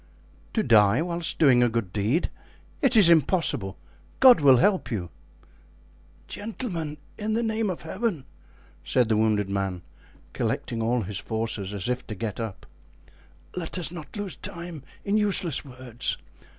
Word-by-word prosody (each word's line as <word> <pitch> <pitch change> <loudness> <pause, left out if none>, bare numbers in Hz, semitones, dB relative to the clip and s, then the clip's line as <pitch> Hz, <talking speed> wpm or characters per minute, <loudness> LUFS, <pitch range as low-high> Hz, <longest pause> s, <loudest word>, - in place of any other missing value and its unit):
"To 220 - +1
die 110 - +5
whilst 170 -1 -2
doing 130 -6 +5
a 120 - +4
good 110 -6 -2
deed! 110 - 0 0.5
It 270 -6 +4
is 200 -5 +8
impossible. 160 - +2 0.4
God 255 -10 +8
will 135 -3 +7
help 190 +9 +2
you." 95 -7 -4 1.2
"Gentlemen, 180 - -5 0.2
in 215 +1 -1
the 235 - +1
name 220 -1 0
of 180 - -5
Heaven!" 190 - -2 0.6
said 125 -3 +2
the 110 - +3
wounded 105 -2 +2
man, 95 -2 -2 0.5
collecting 115 - -2
all 120 +2 +1
his 100 +1 -5
forces, 110 -3 -3
as 100 -1 -3
if 125 0 -2
to 110 - -5
get 110 0 -4
up, 110 -4 -5 0.9
"let 180 0 -3
us 170 -3 -2
not 165 0 -9
lose 205 -3 -4
time 170 -3 -6 0.2
in 200 +2 +2
useless 190 -7 0
words. 125 -2 -4
135 Hz, 150 wpm, -26 LUFS, 110-180 Hz, 1.2 s, is